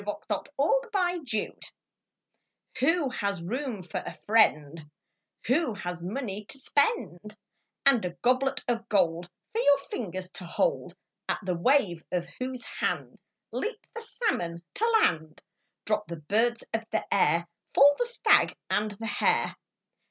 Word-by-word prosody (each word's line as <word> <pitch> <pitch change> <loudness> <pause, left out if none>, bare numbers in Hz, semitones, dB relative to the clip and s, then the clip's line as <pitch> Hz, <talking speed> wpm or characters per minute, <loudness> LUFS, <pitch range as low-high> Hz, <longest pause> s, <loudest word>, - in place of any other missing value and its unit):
A - - -11
FRIEND 340 - -1
IN 220 - +4
NEED - - -12 1.2
Who 295 +2 +3
has 200 -7 -2
room 235 0 -3
for 175 - -4
a - - -7
friend 155 -8 +2 0.6
Who 255 -1 +1
has 180 -2 -5
money 205 +2 -4
to 275 - -8
spend, 240 - 0 0.5
And 270 -5 +5
a 180 -1 -4
goblet 255 +2 +2
of 230 -1 -2
gold 175 -3 +1 0.2
For 450 - -1
your 285 -7 +6
fingers 185 -9 -5
to - - -7
hold, 480 - 0 0.3
At - - -1
the 185 - 0
wave 175 - +2
of 175 -1 -1
whose 255 -1 -4
hand - - -3 0.3
Leap 440 0 -4
the 460 - -6
salmon 290 - -2
to 455 +2 +1
land, 155 -1 0 0.5
Drop 210 -1 0
the 170 - -6
birds 225 +9 +1
of 225 0 0
the 220 - -1
air, 170 -2 +3 0.3
Fall 285 +1 +7
the 485 - +2
stag 480 +1 +3 0.2
and 210 +1 +1
the 210 +2 -8
hare. 215 - +1
220 Hz, 145 wpm, -28 LUFS, 180-275 Hz, 1.2 s, Fall